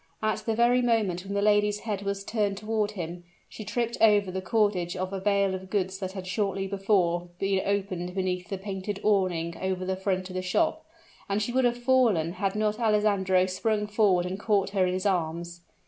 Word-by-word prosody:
At 215 Hz, 0 st, +1 dB
the 225 Hz, -, +1 dB
very 240 Hz, +2 st, +4 dB
moment 215 Hz, -7 st, +1 dB
when 200 Hz, +1 st, -4 dB
the 200 Hz, -, +1 dB
lady's 210 Hz, 0 st, +3 dB
head 210 Hz, -3 st, -3 dB
was 200 Hz, 0 st, -3 dB
turned 205 Hz, -2 st, -1 dB
toward 215 Hz, 0 st, -1 dB
him, 175 Hz, -2 st, -6 dB, 0.2 s
she 215 Hz, -, -9 dB
tripped 235 Hz, +2 st, -2 dB
over 205 Hz, -3 st, +5 dB
the 190 Hz, +1 st, -3 dB
cordage 190 Hz, -3 st, +1 dB
of 185 Hz, +1 st, -3 dB
a 195 Hz, -, -2 dB
bale 200 Hz, 0 st, +2 dB
of 190 Hz, 0 st, -6 dB
goods 190 Hz, -1 st, -1 dB
that 190 Hz, -1 st, -4 dB
had 190 Hz, -2 st, -6 dB
shortly 195 Hz, +1 st, -1 dB
before 190 Hz, -3 st, +1 dB
been 195 Hz, 0 st, +1 dB
opened 190 Hz, -3 st, -2 dB
beneath 180 Hz, -2 st, -2 dB
the 195 Hz, -, -3 dB
painted 195 Hz, +1 st, -5 dB
awning 180 Hz, -5 st, +1 dB
over 185 Hz, -1 st, -2 dB
the 190 Hz, 0 st, -1 dB
front 185 Hz, -1 st, -1 dB
of 185 Hz, -, -9 dB
the 185 Hz, -, -2 dB
shop, 315 Hz, -, 0 dB, 0.5 s
and 200 Hz, +1 st, +1 dB
she 215 Hz, +3 st, -2 dB
would 260 Hz, +1 st, +2 dB
have 240 Hz, 0 st, +1 dB
fallen 240 Hz, -10 st, +2 dB
had 195 Hz, +1 st, -2 dB
not 215 Hz, +1 st, 0 dB
Alessandro 205 Hz, -4 st, +2 dB
sprung 210 Hz, +3 st, -1 dB
forward 205 Hz, -4 st, +2 dB
and 185 Hz, +2 st, -4 dB
caught 205 Hz, -3 st, +1 dB
her 190 Hz, -2 st, +2 dB
in 180 Hz, -, -1 dB
his 185 Hz, -, -3 dB
arms. 170 Hz, -2 st, -1 dB
195 Hz, 205 wpm, -27 LUFS, 185-210 Hz, 0.5 s, over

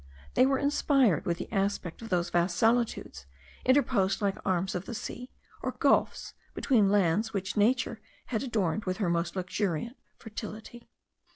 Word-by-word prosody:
They 255 Hz, -, +5 dB
were 270 Hz, 0 st, +2 dB
inspired 275 Hz, -, +2 dB
with 170 Hz, -1 st, 0 dB
the -, -, -7 dB
aspect 195 Hz, -3 st, -1 dB
of 225 Hz, -, -8 dB
those 175 Hz, -2 st, 0 dB
vast 175 Hz, 0 st, +1 dB
solitudes, 225 Hz, -, 0 dB, 0.4 s
interposed 250 Hz, -8 st, +2 dB
like 200 Hz, -2 st, -1 dB
arms 190 Hz, 0 st, 0 dB
of 180 Hz, +1 st, -4 dB
the 235 Hz, -, -6 dB
sea 245 Hz, +3 st, -6 dB, 0.3 s
or -, -, -2 dB
gulfs, -, -, +1 dB, 0.2 s
between 220 Hz, -8 st, +3 dB
lands 205 Hz, +3 st, +2 dB
which 195 Hz, -1 st, -3 dB
nature 235 Hz, +2 st, +1 dB, 0.2 s
had 225 Hz, -4 st, -2 dB
adorned 215 Hz, -6 st, -1 dB
with 185 Hz, -1 st, -2 dB
her 200 Hz, -5 st, 0 dB
most 170 Hz, +1 st, -1 dB
luxuriant 185 Hz, -, -2 dB, 0.2 s
fertility. 220 Hz, +1 st, -9 dB
205 Hz, 155 wpm, -29 LUFS, 185-235 Hz, 0.4 s, They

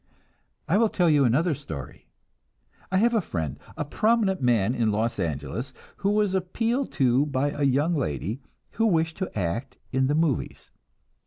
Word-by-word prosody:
I 180 Hz, +7 st, +3 dB
will 225 Hz, -1 st, +4 dB
tell 175 Hz, -5 st, +2 dB
you 145 Hz, -2 st, +4 dB
another 155 Hz, +8 st, +2 dB
story. 80 Hz, -, -8 dB, 0.8 s
I 190 Hz, -, +2 dB
have 235 Hz, +4 st, +3 dB
a 225 Hz, -, +3 dB
friend, 80 Hz, -, -4 dB, 0.2 s
a 150 Hz, -, -2 dB
prominent 210 Hz, +2 st, +1 dB
man 120 Hz, -3 st, +2 dB
in 115 Hz, -4 st, +1 dB
Los 110 Hz, +1 st, -1 dB
Angeles, 80 Hz, -, -3 dB, 0.2 s
who 200 Hz, -, 0 dB
was 210 Hz, -2 st, +2 dB
appealed 225 Hz, +8 st, -1 dB
to 130 Hz, +1 st, +3 dB
by 140 Hz, +1 st, 0 dB
a 145 Hz, -, -6 dB
young 140 Hz, +5 st, +2 dB
lady 110 Hz, -, -2 dB, 0.3 s
who 225 Hz, +1 st, +1 dB
wished 165 Hz, -4 st, +1 dB
to 190 Hz, -, -2 dB
act 115 Hz, +9 st, -3 dB
in 130 Hz, 0 st, +2 dB
the 145 Hz, -, +1 dB
"movies." 155 Hz, -4 st, -1 dB
145 Hz, 165 wpm, -26 LUFS, 120-190 Hz, 0.8 s, will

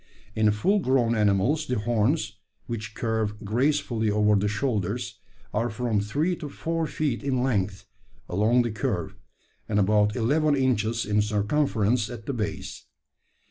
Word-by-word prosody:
In 110 Hz, -1 st, +3 dB
full 105 Hz, -, +2 dB
grown 130 Hz, -7 st, +2 dB
animals 110 Hz, +9 st, +2 dB
the 125 Hz, -, 0 dB
horns, 110 Hz, +1 st, 0 dB, 0.3 s
which 110 Hz, -2 st, -5 dB
curve 110 Hz, -2 st, -2 dB
gracefully 120 Hz, -1 st, +1 dB
over 105 Hz, 0 st, +3 dB
the 100 Hz, +1 st, +1 dB
shoulders, 105 Hz, -2 st, -2 dB, 0.3 s
are 115 Hz, +3 st, 0 dB
from 115 Hz, -1 st, -1 dB
three 150 Hz, -, 0 dB
to 150 Hz, -4 st, -6 dB
four 165 Hz, +2 st, -2 dB
feet 145 Hz, -5 st, -2 dB
in 130 Hz, -3 st, 0 dB
length 100 Hz, -6 st, -1 dB, 0.4 s
along 110 Hz, +6 st, +3 dB
the 120 Hz, -, -2 dB
curve, 110 Hz, -, -2 dB, 0.6 s
and 105 Hz, -, +1 dB
about 105 Hz, +1 st, +3 dB
eleven 145 Hz, +5 st, +2 dB
inches 115 Hz, -4 st, +1 dB
in 105 Hz, 0 st, +2 dB
circumference 110 Hz, +1 st, +1 dB
at 115 Hz, -3 st, -8 dB
the 140 Hz, -, -2 dB
base. 105 Hz, -4 st, -5 dB
110 Hz, 140 wpm, -26 LUFS, 105-130 Hz, 0.6 s, In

